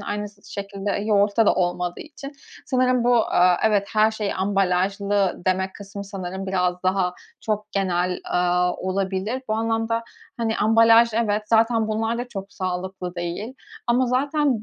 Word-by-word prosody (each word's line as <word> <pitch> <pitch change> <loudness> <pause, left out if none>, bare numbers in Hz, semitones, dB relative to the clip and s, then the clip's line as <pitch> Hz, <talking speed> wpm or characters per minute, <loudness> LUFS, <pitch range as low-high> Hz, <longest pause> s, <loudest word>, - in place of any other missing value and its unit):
aynısı 205 0 -6
şekilde 200 0 -4
yoğurtta 205 +1 +2
da - - +5
olmadığı 175 -1 -1
için 290 -2 -9 0.3
sanırım 255 -2 +2
bu, 245 0 +4 0.2
eee, 180 0 +5
evet, 205 -2 +2
her 215 0 +4
şey 215 -2 -3
ambalajlı 195 0 0
demek 190 +1 0
kısmı 200 0 -8
sanırım 190 -1 -6
biraz 180 -1 0
daha 185 -1 +1 0.3
çok 210 -1 -3
genel, 180 -2 0
aaa, 180 0 +1
olabilir. 195 +6 -2
Bu - - 0
anlamda, 225 +1 -1 0.3
hani, 225 -1 -1
ambalaj 230 +1 +5
evet, 215 -2 +1
zaten 225 0 +3
bunlar 225 +2 -1
da 245 - -4
çok 195 -3 -7
sağlıklı 185 0 -4
değil. 175 +8 -4 0.3
Ama 245 +2 +3
zaten 275 -1 +1
205 Hz, 145 wpm, -23 LUFS, 185-225 Hz, 0.3 s, da